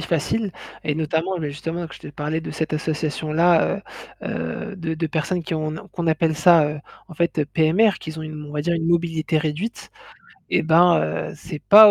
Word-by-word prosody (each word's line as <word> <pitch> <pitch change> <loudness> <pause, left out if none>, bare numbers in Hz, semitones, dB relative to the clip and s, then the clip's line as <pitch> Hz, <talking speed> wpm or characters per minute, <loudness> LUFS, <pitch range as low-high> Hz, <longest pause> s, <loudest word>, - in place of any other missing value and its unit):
facile. 175 +6 -1 0.3
Et 150 - 0
notamment, 160 +4 -1
mais 150 -3 -3
justement, 165 +4 -4
que 145 - -11
je - - -13
t'ai - - -10
parlé 150 +3 -2
de - - -6
cette 160 - -3
association-là, 155 +2 +1 0.4
heu - - -4 0.4
heu, 200 - -9
de 165 -3 -3
de 165 +1 -1
personnes 165 +3 -1
qui 165 +1 -3
ont, 155 -1 -1
ne 155 - -6
qu'on 170 -2 -5
appelle 160 0 +2
ça, 165 0 +6
heu, 150 0 -5 0.3
en 170 - -11
fait, 170 +1 0
heu, 145 - 0
PMR, 165 +9 +4
qu'ils 160 0 -7
ont - - -5
une, 155 -1 -7
on 145 - -9
va 150 -1 -2
dire 170 +2 +1
une 165 -1 -1
mobilité 165 -2 +1
réduite. 160 +9 -3 0.6
Et - - +3
bah 165 +2 +5 0.3
heu, - - -10
c'est 160 -2 -7
pas 210 +1 +10
160 Hz, 210 wpm, -22 LUFS, 155-170 Hz, 0.6 s, pas